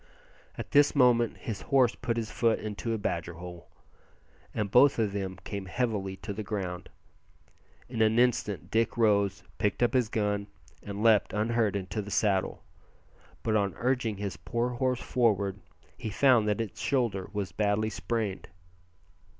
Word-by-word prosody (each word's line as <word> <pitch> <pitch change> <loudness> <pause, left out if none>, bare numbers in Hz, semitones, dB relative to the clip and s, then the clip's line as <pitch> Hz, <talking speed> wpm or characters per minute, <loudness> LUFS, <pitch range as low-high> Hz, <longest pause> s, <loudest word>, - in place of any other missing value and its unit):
At - - -7
this 145 0 +5
moment 120 -4 +4
his 110 -4 -5
horse 130 -4 +3
put 115 -1 -3
his 110 -2 -3
foot 115 -2 +2
into 110 +2 -4
a 115 - 0
badger 85 -4 -3
hole, 90 0 -10 0.8
and 105 -3 -2
both 140 +3 +6
of 110 -3 +1
them 95 -2 -3
came 100 -2 -5
heavily 105 -3 -2
to 100 0 -4
the 105 - -5
ground. 95 -4 -4 1.0
In 120 -2 -3
an 110 +1 +3
instant 110 -8 +1
Dick 115 +1 +1
rose, 100 -4 +2 0.2
picked 105 +2 +1
up 120 - +2
his 125 -4 +2
gun, 105 -2 -1 0.3
and 100 +1 -5
leaped 110 -3 +4
unhurt 110 -1 +1
into 95 +1 -3
the 100 - -8
saddle. 100 -2 0 0.8
But 110 -1 +1
on 100 -2 +1
urging 120 -4 0
his 100 -1 -4
poor 120 0 -2
horse 125 0 -1
forward 100 -5 +1 0.4
he 110 - -5
found 120 -1 +4
that 105 +1 +1
its 110 -5 -6
shoulder 115 -9 0
was 100 -4 -3
badly 105 +3 0
sprained. 105 -3 -3
110 Hz, 160 wpm, -29 LUFS, 100-115 Hz, 1.0 s, both